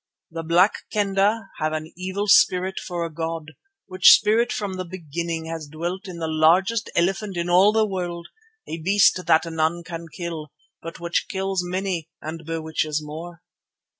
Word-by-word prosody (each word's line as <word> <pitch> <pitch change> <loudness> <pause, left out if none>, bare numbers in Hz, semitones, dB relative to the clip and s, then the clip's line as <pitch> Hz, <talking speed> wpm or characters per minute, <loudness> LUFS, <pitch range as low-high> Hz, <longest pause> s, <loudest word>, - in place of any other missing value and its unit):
The 165 0 -4
Black 170 +5 +3
Kendah 200 +1 +1
have 155 0 0
an 155 0 -5
evil 190 +3 -3
spirit 190 -1 +4
for 175 -2 -4
a 165 - -7
god, 160 0 -4 0.3
which 185 -1 +7
spirit 230 +3 +3
from 205 -4 -3
the 185 0 -4
beginning 170 -2 -5
has 160 -2 -6
dwelt 175 +6 -5
in 180 -2 -7
the 165 -1 -3
largest 180 +8 +3
elephant 195 +2 0
in 170 0 -1
all 190 +4 +6
the 220 0 +3
world, 175 -4 -4 0.4
a 165 - -5
beast 190 +1 +4
that 160 0 +4
none 165 +1 -1
can 170 -1 -7
kill, 165 -4 -6 0.3
but 165 0 -8
which 170 0 -1
kills 190 -1 -1
many 180 -2 -3
and 160 +1 -7
bewitches 160 -2 -2
more. 165 +3 -9
170 Hz, 165 wpm, -23 LUFS, 160-190 Hz, 0.4 s, which